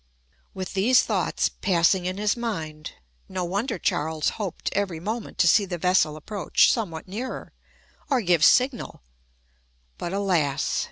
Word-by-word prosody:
With 185 Hz, -1 st, -5 dB
these 235 Hz, +7 st, +4 dB
thoughts -, -, 0 dB
passing 180 Hz, 0 st, +1 dB
in 185 Hz, +1 st, -3 dB
his 210 Hz, 0 st, +1 dB
mind, 160 Hz, -11 st, -5 dB, 0.4 s
no 185 Hz, -1 st, -3 dB
wonder 200 Hz, +6 st, -2 dB
Charles 155 Hz, -1 st, 0 dB
hoped 195 Hz, -6 st, -4 dB
every 190 Hz, -5 st, -1 dB
moment 220 Hz, +6 st, -5 dB
to 175 Hz, -, +4 dB
see 200 Hz, +5 st, +5 dB
the 180 Hz, -3 st, -4 dB
vessel 175 Hz, -3 st, +2 dB
approach 200 Hz, +5 st, +2 dB
somewhat 185 Hz, -10 st, -3 dB
nearer, 230 Hz, +7 st, -6 dB, 0.6 s
or 265 Hz, -4 st, +2 dB
give 175 Hz, -6 st, +2 dB
signal: 250 Hz, -, +3 dB, 1.0 s
but, 175 Hz, -, -4 dB
alas! 180 Hz, -8 st, 0 dB
185 Hz, 135 wpm, -25 LUFS, 165-210 Hz, 1.0 s, see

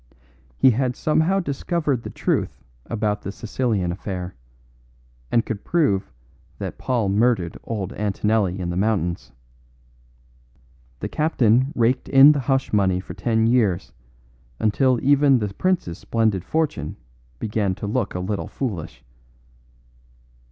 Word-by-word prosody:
He 130 Hz, -, +6 dB
had 125 Hz, +1 st, 0 dB
somehow 160 Hz, +5 st, +2 dB
discovered 145 Hz, -3 st, -1 dB
the -, -, -7 dB
truth -, -, -1 dB, 0.3 s
about 105 Hz, -2 st, -1 dB
the 100 Hz, -, -5 dB
Sicilian 105 Hz, -4 st, -1 dB
affair, 90 Hz, -1 st, -5 dB, 1.0 s
and 115 Hz, -, +2 dB
could 105 Hz, -3 st, -5 dB
prove 140 Hz, -, +1 dB, 0.5 s
that -, -, -6 dB
Paul 120 Hz, -5 st, 0 dB
murdered 100 Hz, -3 st, +1 dB
old 100 Hz, -4 st, -4 dB
Antonelli 105 Hz, -2 st, 0 dB
in 85 Hz, -1 st, -3 dB
the -, -, -3 dB
mountains. 95 Hz, -4 st, -1 dB, 1.7 s
The -, -, -2 dB
captain 130 Hz, -4 st, +2 dB
raked 120 Hz, +2 st, +1 dB
in 135 Hz, +2 st, +8 dB
the 145 Hz, -, 0 dB
hush 135 Hz, -1 st, 0 dB
money 95 Hz, -3 st, +3 dB
heavily -, -, -1 dB
for -, -, -9 dB
ten 110 Hz, -2 st, +1 dB
years, 110 Hz, -7 st, +1 dB, 0.7 s
until 125 Hz, +4 st, +2 dB
even 140 Hz, 0 st, +5 dB
the 105 Hz, -4 st, -3 dB
prince's 175 Hz, -, -1 dB
splendid 110 Hz, -5 st, 0 dB
fortune 150 Hz, -, -2 dB, 0.4 s
began 105 Hz, -, -1 dB
to -, -, -6 dB
look 105 Hz, 0 st, -1 dB
a -, -, -1 dB
little 95 Hz, +3 st, -3 dB
foolish. 100 Hz, -, -5 dB
110 Hz, 130 wpm, -22 LUFS, 95-130 Hz, 1.7 s, in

